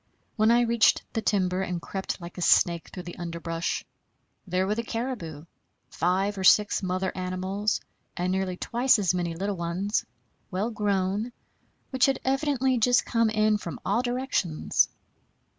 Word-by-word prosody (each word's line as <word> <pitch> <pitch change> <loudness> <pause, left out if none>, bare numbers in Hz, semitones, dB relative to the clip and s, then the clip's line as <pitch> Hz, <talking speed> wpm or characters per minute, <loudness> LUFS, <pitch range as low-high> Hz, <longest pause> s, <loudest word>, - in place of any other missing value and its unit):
When 215 -1 +3
I 240 +1 +5
reached 235 -2 +3
the 225 - -1
timber 190 -3 +1
and 180 -2 -2
crept 190 +3 -4
like 175 +1 -9
a - - -4
snake 170 -1 +3
through 180 - -8
the 175 0 -9
underbrush, 170 -1 -3 0.6
there 185 +1 +1
were 200 - 0
the 230 - -1
caribou, 225 - -5 0.5
five 190 +3 0
or - - -3
six 210 +3 +5
mother 185 0 -1
animals, 185 +3 -1 0.4
and 180 +1 0
nearly 190 -1 -1
twice 245 +5 +3
as 190 -4 +1
many 175 -2 -2
little 195 +3 -2
ones, 175 +5 -1 0.5
well 200 +5 -2
grown, 205 +1 0 0.6
which 260 0 +3
had 270 -1 +1
evidently 265 -2 +1
just 245 +2 +4
come 230 -2 +2
in 215 -1 +2
from 170 - -6
all 240 - +2
directions. 245 - 0
195 Hz, 155 wpm, -27 LUFS, 180-230 Hz, 0.6 s, I